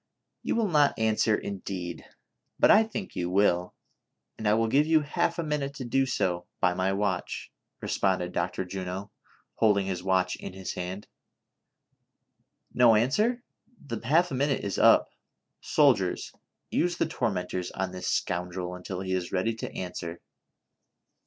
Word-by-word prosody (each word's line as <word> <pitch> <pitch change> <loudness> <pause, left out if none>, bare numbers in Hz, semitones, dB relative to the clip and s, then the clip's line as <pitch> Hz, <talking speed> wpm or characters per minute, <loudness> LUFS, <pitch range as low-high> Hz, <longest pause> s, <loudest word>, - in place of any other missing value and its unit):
" - - -56
You - - -1
will 230 -2 +2
not 150 -5 +3
answer, 110 0 +2
indeed! 95 -4 -5 0.5
But - - +6
I 210 - +8
think 215 -3 -5
you 90 -1 -2
will, 90 -2 +2 0.6
and 110 - -3
I 105 - +4
will 115 0 +2
give 145 +6 +3
you 160 -1 +4
half 170 +3 -1
a 170 - -1
minute 150 -2 -2
to 130 - -6
do 135 +3 +1
so 90 -8 -1
by 90 - +3
my 95 +2 0
watch," 95 -2 -2 0.3
responded 90 -2 0
Dr. 90 +1 -2
Juno, 95 +2 -5 0.5
holding 105 -3 +3
his 95 -2 -3
watch 95 -1 +1
in - - -8
his 95 0 -5
hand: 90 +3 -5 1.7
"No 120 -2 +6
answer, 210 - +2 0.4
the 115 -5 -6
half 160 +8 +3
a - - -3
minute 140 +1 0
is 100 -1 -2
up; - - +5 0.5
soldiers, - - +2 0.4
use 175 0 +1
the - - +2
torment 95 - -2
ors 90 -1 -2
on 95 -1 -3
this 90 0 -6
scoundrel 90 +1 -2
until 90 +1 -6
he 95 -1 -2
is 90 -1 -2
ready 95 +5 0
to 110 - -6
answer." 90 -2 -6
100 Hz, 160 wpm, -28 LUFS, 90-135 Hz, 1.7 s, I